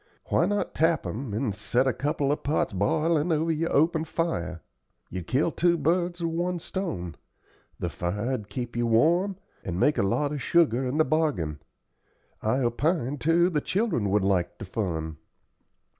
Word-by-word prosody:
Why - - +3
not 205 0 -1
tap 160 0 +2
'em, 120 +1 -4
and 110 +1 -1
set 120 +5 0
a 130 - +2
couple 145 -1 0
of 150 - -1
pots 145 -6 0
b'ilin' 155 - +1
over 160 +1 +1
your 165 +1 -1
open 160 +2 +3
fire? 90 - -2 0.5
You'd 90 -1 -5
kill 135 +8 +2
two 170 +1 +2
birds 175 +3 0
with 165 - 0
one 175 +2 -1
stone; 160 - -4 0.6
the 90 - -2
fire'd 105 - -3
keep 120 +2 -5
you 120 0 +1
warm, 170 - +3 0.3
and 90 -1 -3
make 150 +9 +3
a - - +4
lot 140 +9 +1
of 145 -2 -3
sugar 145 -7 +3
in 130 +4 -1
the 155 - +4
bargain. 140 - 0 0.8
I 110 +4 +1
opinion, 145 +3 0
too, 170 +3 +3
the 150 -3 +1
children 190 - 0
would 100 0 +2
like 95 -3 +1
the - - -7
fun." 80 -6 -3
140 Hz, 170 wpm, -27 LUFS, 105-165 Hz, 0.8 s, a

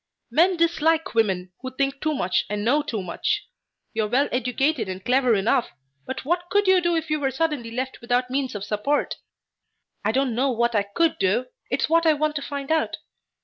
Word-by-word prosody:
Men 355 +3 +4
dislike 325 -1 +2
women 190 -5 +1
who 260 -1 -7
think 275 0 -1
too 310 -1 0
much 185 -7 0
and 210 0 -2
know 285 +6 +3
too 230 -9 -4
much. 415 - -2 0.5
You 220 -2 0
are - - -2
well 260 +6 +2
educated 250 0 0
and 185 0 -6
clever 250 -2 +3
enough, 210 +4 +1 0.4
but 260 0 -5
what 350 +3 -1
could 410 +2 +2
you 375 -1 +5
do 345 -1 +1
if 320 -1 -2
you 305 - +1
were 275 -2 +1
suddenly 270 -3 -1
left 260 +3 -4
without 245 +1 0
means 265 -3 -1
of 200 - -4
support?" 215 +8 -1 0.9
"I 210 - +2
don't 265 0 +1
know 260 +4 +1
what 235 -1 +1
I 210 - +3
could 330 -1 +2
do. 200 +7 +2 0.2
It's 255 - 0
what 330 +1 +3
I 315 - +6
want 305 0 -1
to - - -3
find 280 0 -5
out. 320 0 +1
265 Hz, 205 wpm, -24 LUFS, 230-310 Hz, 0.9 s, I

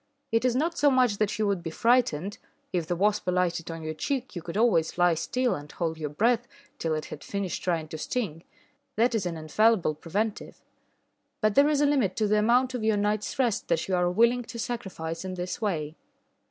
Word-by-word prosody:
It 225 +1 +2
is 250 -1 +2
not 330 +5 0
so 290 - +5
much 250 -6 +3
that 215 0 0
you 215 - +1
would 200 -3 0
be 165 - -4
frightened: 205 -3 +1 0.3
if 170 -3 -1
the 175 - 0
wasp 205 +2 +1
alighted 180 -2 0
on 165 -1 -6
your 155 0 -3
cheek, 255 - -3
you 175 - -4
could 175 +3 -5
always 210 -10 +2
lie 175 -1 +4
still 250 +9 0
and 145 +1 -7
hold 160 -2 -3
your 150 -2 -3
breath 230 +9 +1 0.3
till 160 -1 0
it 155 - -4
had - - -9
finished 200 -3 -3
trying 165 -3 -1
to 160 - -6
sting 175 -9 -3 0.5
that 235 +3 +3
is 205 -5 0
an 170 -2 -4
infallible 185 +3 +2
preventive. 200 +8 -4 0.8
But 215 -1 +2
there 280 +4 +5
is 295 -1 +2
a - - +5
limit 265 -10 +2
to 220 - +1
the 210 +1 +3
amount 245 +4 +3
of 245 -3 -3
your 220 -1 +2
night's 210 +1 -1
rest 245 -6 0
that 165 -1 0
you 190 - +1
are 180 0 +2
willing 235 +6 +3
to 235 - -8
sacrifice 190 -9 -4
in 185 -1 -5
this 180 +5 -4
way. 160 -7 -2
200 Hz, 215 wpm, -27 LUFS, 170-235 Hz, 0.8 s, so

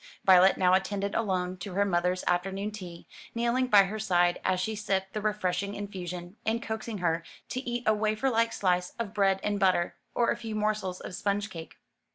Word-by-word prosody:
Violet 190 0 +7
now 180 -1 +4
attended 200 +1 0
alone 185 -4 -1
to 180 0 -7
her 200 +1 +3
mother's 180 -1 0
afternoon 195 +3 -1
tea, 180 -5 -9 0.3
kneeling 240 +2 +1
by 205 -5 +7
her 205 +3 -4
side 175 -4 +2
as 185 -1 +1
she 220 +4 -2
sipped 195 -2 -2
the 215 - -2
refreshing 200 -2 -1
infusion, 180 -2 -6
and 225 +1 0
coaxing 220 -1 -4
her 170 -2 0 0.3
to 255 - -2
eat 240 0 -2
a 215 - +4
waferlike 225 +2 +1
slice 180 -3 0
of 225 -3 -4
bread 195 -2 +2
and 205 -1 0
butter, 185 -3 +2 0.2
or 235 - +3
a - - -1
few 225 -2 -5
morsels 210 -3 -1
of - - -7
sponge 200 +2 -1
cake. 165 -3 -9
200 Hz, 190 wpm, -29 LUFS, 180-215 Hz, 0.3 s, Violet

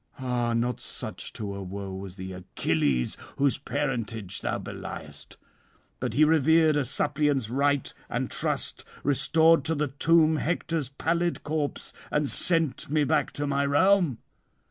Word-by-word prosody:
Ah, 125 -3 -1
not 120 +1 0
such - - -5
to 100 -2 -5
a 100 - -6
foe 95 +1 -6
was 95 -1 -7
the 95 -1 -7
Achilles 80 -7 -1 0.2
whose 140 -1 +2
parentage 115 -8 -3
thou - - -1
beliest; - - -8 0.6
but - - -2
he 155 - +5
revered 160 0 +4
a 145 - +2
suppliant's 145 -3 0
right 140 +1 +1 0.2
and - - -2
trust, - - -1 0.2
restored 160 +4 +4
to 160 0 +1
the 150 -1 -1
tomb 160 +3 +3
Hector's 165 -3 -1
pallid 170 +5 -1
corpse, 150 -1 -3 0.2
and 150 -2 +1
sent 165 -7 +2
me 150 0 +2
back 140 - +1
to 145 - -2
my 140 0 +1
realm." 150 - +3
140 Hz, 145 wpm, -27 LUFS, 115-155 Hz, 0.6 s, he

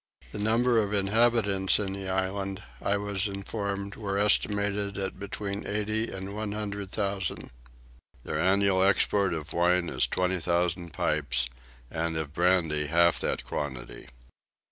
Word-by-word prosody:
The 105 - -5
number 115 +3 +3
of 105 -1 -1
inhabitants 100 -1 +3
in 95 -2 -2
the 95 -1 -5
island 95 +1 -2 0.2
I 100 - +1
was 100 0 0
informed 100 0 -4
were 100 -3 -3
estimated 100 -1 +1
at 95 -1 -4
between 100 0 -4
eighty 110 +2 0
and 95 +1 -6
one 105 -1 -3
hundred 100 -2 -4
thousand. 100 -3 -2 0.7
Their - - -3
annual 95 0 +3
export 100 0 +3
of 80 -1 -6
wine 90 0 +2
is 65 - +1
twenty 90 0 0
thousand 85 0 0
pipes 75 -8 +1 0.4
and 85 0 -2
of 80 -2 -4
brandy 80 -4 +2
half 85 +2 +4
that - - -2
quantity. 65 -4 -5
100 Hz, 140 wpm, -28 LUFS, 90-100 Hz, 0.7 s, half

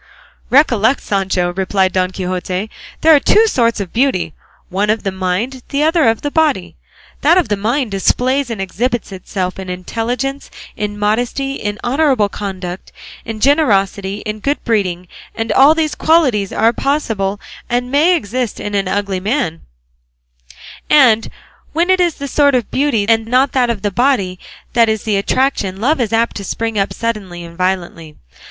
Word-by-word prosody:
"Recollect, 255 -3 +3
Sancho," 190 -3 -1
replied 190 0 0
Don 185 -1 +1
Quixote, 185 +2 -4 0.3
"there 320 0 +7
are - - +5
two 430 +10 +4
sorts 235 - +1
of 195 -4 -5
beauty, 185 - +1 0.4
one 200 +3 -1
of 215 +1 +1
the 195 - -1
mind, 190 +8 -2
the 285 +1 0
other 320 -1 +3
of 225 -1 +1
the 290 - -2
body; 275 - +1 0.5
that 330 +5 +4
of 355 -12 +1
the 205 - +2
mind 230 +4 -1
displays 255 +7 +1
and 230 -3 -4
exhibits 230 +5 -2
itself 185 0 -4
in 190 -1 -7
intelligence, 240 +9 -3 0.3
in 205 0 -4
modesty, 245 +6 -1
in 205 -5 -4
honourable 265 -5 +2
conduct, 190 -3 -6 0.3
in 225 -2 -5
generosity, 205 - +1
in 215 0 -4
good 285 +7 -2
breeding; 185 -6 -1 0.3
and 225 0 -2
all 280 +4 +6
these 315 -2 0
qualities 260 - +2
are 225 +2 +2
possible 225 -9 -1 0.3
and 245 +1 -1
may 315 +6 +4
exist 245 - -3
in 205 - -5
an 195 -2 0
ugly 200 -1 -1
man; 195 - -1 1.3
and 240 -7 +5 0.4
when 340 +3 +2
it 375 - +3
is 345 -3 +2
this 280 -1 -6
sort 285 -2 +3
of 240 -4 -1
beauty 255 -7 +1
and 225 -1 +2
not 255 +3 +2
that 250 -2 +1
of 220 -4 -3
the 205 - 0
body 200 -6 +1 0.3
that 230 -1 +4
is 220 -2 -1
the 215 -2 0
attraction, 200 -2 0
love 265 +5 +1
is 225 - -1
apt 230 +1 +1
to 200 - -5
spring 225 +2 -2
up 195 - 0
suddenly 200 -7 -4
and 170 0 -11
violently. 175 -3 -3
225 Hz, 170 wpm, -16 LUFS, 195-270 Hz, 1.3 s, there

